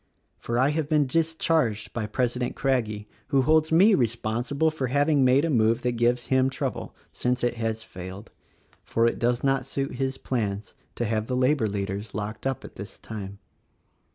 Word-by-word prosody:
For 120 - -2
I 130 +3 +4
have 150 -1 -1
been 150 -2 +3
discharged 160 -6 0
by 110 -3 -2
President 125 +3 -1
Crag 130 -4 +1
gie 105 0 -7 0.2
who 135 -2 +3
holds 155 +2 +3
me 195 +7 +6
responsible 120 - 0
for 140 -4 -2
having 145 +2 +3
made 130 +4 +4
a - - 0
move 115 -1 +2
that 125 - +1
gives 120 +1 +1
him 130 0 +4
trouble - - -4
— - - -36
since 125 0 +1
it 120 -1 0
has 115 -1 -2
failed. 95 +1 -9 0.5
For 115 - +1
it 115 - +1
does 120 0 +1
not 135 0 +2
suit 135 -2 -3
his 135 0 -1
plans 105 -6 -3 0.2
to 120 - -1
have 110 0 -1
the 125 - -1
labor 130 -2 +2
leaders 100 +1 -4
locked 105 +4 -4
up 135 -2 -3
at - - -12
this - - -8
time. 100 -2 -7
125 Hz, 185 wpm, -26 LUFS, 110-140 Hz, 0.5 s, me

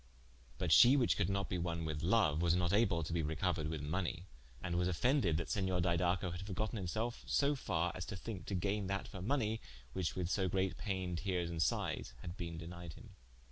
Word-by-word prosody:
But - - -1
shee 130 +4 +8
whiche 125 - +3
could - - +1
not 100 0 0
be 90 - -2
wonne 85 -1 -2
with 80 -1 -3
loue, 100 -2 +3
was 85 +2 +3
not 90 0 +1
able 100 -6 +3
to 80 - -4
be 85 - +1
recouered 80 +1 -1
with 80 -2 -3
money: 85 +3 -2 0.4
and 85 -2 -2
was 90 0 +2
offended 95 - +2
that 85 - -3
Senior 95 -4 +1
Didaco 85 +1 +1
had 85 +1 -5
forgotten 105 +4 -3
himselfe 110 +6 -2
so 145 +1 +3
farre 90 - -1
as 90 - -5
to 105 - -5
thinke 95 -2 -6
to 100 - -2
gaine 100 +2 0
that 100 +1 -2
for 95 - -8
money, 110 -1 0 0.3
which 90 0 -1
with 90 -2 -1
so 95 +1 +1
great 95 +1 0
paine, 95 -4 -2
teares 90 -2 -1
and 80 -1 -2
sighes, 80 - 0
had 85 +1 -6
bene 85 -4 -5
denied 85 0 -7
him. - - -13
90 Hz, 215 wpm, -36 LUFS, 85-100 Hz, 0.4 s, shee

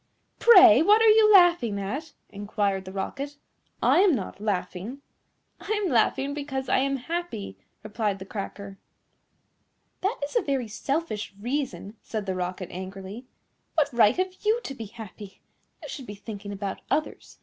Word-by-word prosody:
"Pray, 375 -10 +8
what 415 +6 +6
are 450 0 +6
you 430 0 +6
laughing 345 - +5
at?" 275 +11 -5 0.2
inquired 200 -1 -2
the 190 - -8
Rocket; 275 +9 -5 0.5
"I - - +5
am 380 -5 +5
not 200 -2 -6
laughing." 200 +4 -3 0.6
"I 430 +1 -2
am 360 - -1
laughing 265 +4 +2
because 275 -3 -4
I - - +3
am 275 +1 +1
happy," 270 - -5 0.3
replied 215 -2 -2
the 190 - -9
Cracker. 200 -1 -7 1.2
"That 395 +6 -1
is - - -14
a 475 - +4
very 270 -4 -1
selfish 220 -2 -3
reason," 245 -3 -4
said 215 -3 -5
the 190 - -2
Rocket 185 0 -4
angrily. 190 +6 -8 0.5
"What 290 -4 +2
right 230 +1 +4
have 370 0 -2
you 435 +3 +2
to 275 - -5
be 230 -4 -7
happy? 205 -1 -11 0.4
You - - -6
should 265 - -8
be 205 - -7
thinking 200 -1 -8
about 200 -1 -5
others. 310 - -3
235 Hz, 160 wpm, -26 LUFS, 200-310 Hz, 1.2 s, Pray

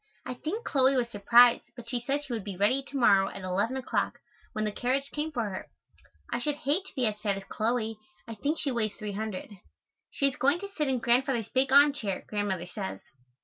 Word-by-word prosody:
I - - -4
think 345 - -5
Chloe 270 -1 +3
was 245 -2 +1
surprised, 235 +3 +6
but 235 -1 -10
she 240 0 -2
said 280 +4 -1
she 270 -4 -5
would 220 -4 -3
be 195 -2 -6
ready, 210 +8 +2
to 280 - -5
morrow, 200 -6 +5
at 195 - -9
eleven 200 +8 0
o'clock, 260 - -1 0.3
when 215 0 -2
the 210 - -1
carriage 260 +6 -1
came 305 +1 -3
for 240 -6 -1
her. 185 - -6 0.7
I 240 - 0
should 295 +4 -1
hate 300 +6 0
to - - -13
be 255 - +1
as 210 -1 -1
fat 205 -2 -1
as 195 - -7
Chloe. 220 +1 -2 0.3
I 230 - -5
think 290 +9 -1
she 285 - -1
weighs 220 -4 -1
300. 210 -1 -5 0.6
She 280 - +1
is 275 - -3
going 280 +6 +3
to 400 0 -7
sit 300 -2 0
in 265 -1 +1
Grandfather's 240 -1 +1
big 265 +1 +1
arm 285 +1 +7
chair, 205 -9 -4
Grandmother 200 -4 -2
says. 95 - -6
240 Hz, 220 wpm, -29 LUFS, 210-275 Hz, 0.7 s, arm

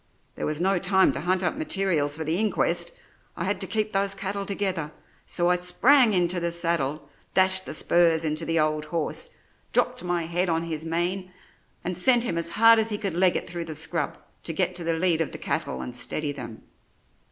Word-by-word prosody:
There - - -4
was 150 0 -2
no 190 +1 +1
time 190 +1 +3
to - - -5
hunt 185 +3 0
up 175 - 0
materials 190 - +1
for 160 - -3
the 160 +4 -1
inquest; 220 - 0 0.5
I - - -3
had - - -1
to - - +1
keep 215 -1 -1
those 195 0 +1
cattle 200 0 -4
together, 190 -6 -1 0.4
so 175 0 +1
I 180 - +3
sprang 225 +7 +4
into 175 0 +2
the 170 0 -2
saddle, 165 -4 -1 0.3
dashed 190 0 +3
the - - -5
spurs 165 -1 +2
into 155 +1 -2
the 165 0 0
old 155 0 0
horse, 160 0 -2 0.4
dropped - - 0
my 175 -1 -1
head 175 +2 -1
on 165 0 0
his 160 -2 -4
mane, 180 +3 -2 0.5
and 180 +1 -3
sent 235 +7 +4
him 170 -8 -1
as 170 0 +1
hard 225 +5 +6
as 220 0 +2
he 210 - 0
could 200 -4 -2
leg 180 +1 +2
it - - -2
through 170 -1 -5
the 155 - -7
scrub 160 -1 -2 0.2
to 165 - -4
get 180 +2 0
to 175 - -2
the 165 0 0
lead 165 0 +1
of 160 - -3
the - - -5
cattle 155 -3 -2
and 125 - -7
steady 150 +4 -2
them. 120 -5 -9
175 Hz, 210 wpm, -25 LUFS, 160-190 Hz, 0.5 s, hard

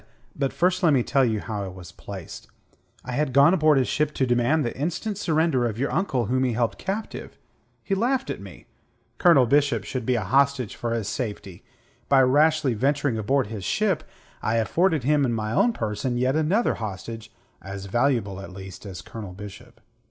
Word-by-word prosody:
but 135 -1 -1
first 180 +1 +1
let 160 -4 +4
me 130 -3 +3
tell 135 +2 +2
you 110 -4 +1
how 105 -1 -4
I - - -5
was 90 -2 -10
placed. 95 -1 -9 0.6
I 125 - -5
had 145 +2 0
gone 140 +5 +6
aboard 155 -5 +4
his 130 - +2
ship 150 0 0
to 130 - +1
demand 120 +5 +2
the 120 - -3
instant 175 - -2
surrender 155 -8 +1
of 110 -2 -4
your 135 +4 -1
uncle 135 - 0
whom 130 +4 +1
he 125 -2 +1
held 115 0 -1
captive. 205 +3 -5 0.5
He 195 - -2
laughed 255 +6 0
at - - -6
me. - - -12 0.5
Colonel 165 -8 +6
Bishop 140 -4 +2
should 125 +4 -4
be 125 - +2
a 110 - -1
hostage 130 +2 +1
for 120 - -3
his 115 -3 -2
safety. 105 -6 -5 0.5
By 135 -1 +6
rashly 145 0 +3
venturing 135 +1 0
aboard 130 +5 +1
his 105 -2 -7
ship, 190 - 0 0.4
I 110 +2 0
afforded 160 - +1
him 145 +2 +3
in 125 -3 +1
my 110 -1 -2
own 240 - +3
person 115 - -2
yet 130 +3 +1
another 170 +10 +2
hostage 110 +2 -6 0.3
as 95 0 -7
valuable 115 -3 0
at 100 0 -9
least 95 +1 -10
as 95 -3 -8
Colonel 105 -5 -8
Bishop. 105 +5 -11
125 Hz, 190 wpm, -24 LUFS, 110-150 Hz, 0.6 s, gone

